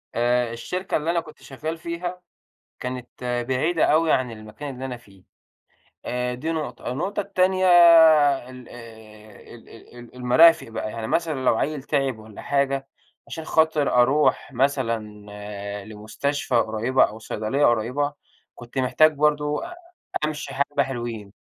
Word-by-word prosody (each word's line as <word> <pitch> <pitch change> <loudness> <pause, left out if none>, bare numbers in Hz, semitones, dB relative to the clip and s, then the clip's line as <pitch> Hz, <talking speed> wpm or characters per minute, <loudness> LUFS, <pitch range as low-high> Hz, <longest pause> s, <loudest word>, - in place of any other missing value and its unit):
آآ 120 0 +1
الشركة 180 +10 -3
اللي 160 +2 -1
أنا 170 - +1
كنت 160 -2 -12
شغّال 155 +4 -6
فيها، 175 +2 -5 0.6
كانت 125 -1 -5 0.4
بعيدة 155 +6 +1
أوي 160 0 +3
عن 125 -2 +1
المكان 110 +6 -8
اللي 130 +1 -7
أنا 125 -2 -5
فيه، 100 -5 -21 0.8
آآ 125 0 -2
دي 155 +6 -3
نقطة، 145 -6 -4
النقطة 195 +10 -2
التانية 185 -1 +1 0.8
ال 125 -2 -12
آآ 110 -3 -14
ال 115 - -15
ال 120 +1 -15
ال 120 0 -13
المرافق 125 +5 +5
بقى 110 -1 -5
يعني 115 0 -5
مثلًا 155 -4 -1
لو 115 - +3
عيّل 150 +1 -2
تعب 135 -5 -1
والّا 110 -1 -12
حاجة، 140 -1 0 0.4
عشان 160 - -7
خاطر 160 -2 +2
أروح 145 +2 +1
مثلًا 125 -4 0 0.8
لمستشفى 110 +6 -4
قريبة 115 +3 +2
أو 110 +2 -4
صيدلية 110 +6 -1
قريبة، 125 +6 0 0.4
كنت 120 +2 -9
محتاج 155 +5 +4
برضه 150 0 +1 0.6
أمشي 150 -3 -4
حبّة 140 +1 0
حلوين. 120 -6 -6
130 Hz, 135 wpm, -23 LUFS, 115-150 Hz, 0.8 s, المرافق